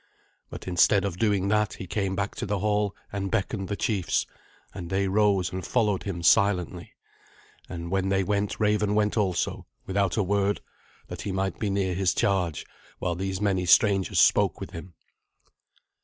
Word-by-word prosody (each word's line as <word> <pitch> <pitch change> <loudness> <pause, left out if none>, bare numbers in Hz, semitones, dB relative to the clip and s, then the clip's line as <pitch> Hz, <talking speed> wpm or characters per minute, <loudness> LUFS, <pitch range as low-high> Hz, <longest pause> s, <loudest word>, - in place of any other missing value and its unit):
But - - -9
instead 95 +3 +3
of 90 -2 -4
doing 100 -3 +1
that, 105 0 +1
he - - -7
came 95 +1 -2
back 100 +1 -2
to - - -3
the 105 +1 -1
hall 105 0 0 0.2
and 100 -1 -2
beckoned 95 +1 -2
the 100 - -2
chiefs, 100 -6 0 0.5
and 90 -4 -7
they 95 +1 0
rose 100 -2 +2
and 95 0 -4
followed 105 -2 +1
him 90 -4 -5
silently. 95 -2 +2 0.8
And 85 -1 -6
when 95 0 0
they 95 0 +2
went 100 +1 -1
Raven 105 -1 +1
went 105 -1 +1
also, 95 -6 -1 0.2
without 95 0 0
a 105 - +3
word, 100 +1 0 0.5
that - - -7
he 100 - -4
might 95 -1 -2
be 105 - -1
near 95 -2 0
his 95 0 +1
charge 90 -6 0 0.3
while 90 - -2
these 95 +1 -3
many 95 -3 0
strangers 95 +2 +4
spoke - - +4
with - - -7
him. 85 +1 -9
95 Hz, 170 wpm, -26 LUFS, 95-105 Hz, 0.8 s, strangers